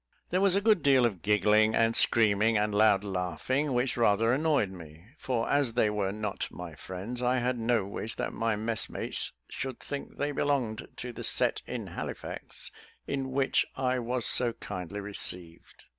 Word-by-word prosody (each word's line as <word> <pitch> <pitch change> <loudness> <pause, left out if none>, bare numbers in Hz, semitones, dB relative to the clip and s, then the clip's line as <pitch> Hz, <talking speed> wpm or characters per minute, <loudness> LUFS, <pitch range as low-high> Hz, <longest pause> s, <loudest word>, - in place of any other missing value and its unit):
There 185 +2 +2
was 195 -2 +4
a 200 - +2
good 215 -4 +4
deal 135 -3 +5
of 100 -8 -1
giggling, 105 +2 +3
and 115 0 +3
screaming, 110 0 +4
and 105 0 0
loud 105 -1 +4
laughing, 100 - -1
which 125 +1 +1
rather 115 0 +3
annoyed 145 -8 +1
me; 80 -2 -12
for 120 -3 -1
as 140 -5 +1
they 110 -3 +2
were 100 -2 -1
not 105 -1 -3
my 90 -2 -8
friends, 95 +9 -6
I 125 +1 +2
had 125 0 0
no 115 -3 +1
wish 105 +3 -5
that - - -3
my 115 -1 0
messmates 110 +1 -1 0.2
should 130 -1 -5
think 140 -1 -7
they 145 +1 -1
belonged 135 -6 -1
to 125 0 -6
that - - -7
set - - +2
in - - -4
Halifax - - -7 0.3
in 135 -1 -3
which 135 0 +2
I 130 -1 0
was 120 0 -1
so 120 -2 +3
kindly 95 -3 -6
received. 90 -4 -6
115 Hz, 175 wpm, -29 LUFS, 105-130 Hz, 0.3 s, deal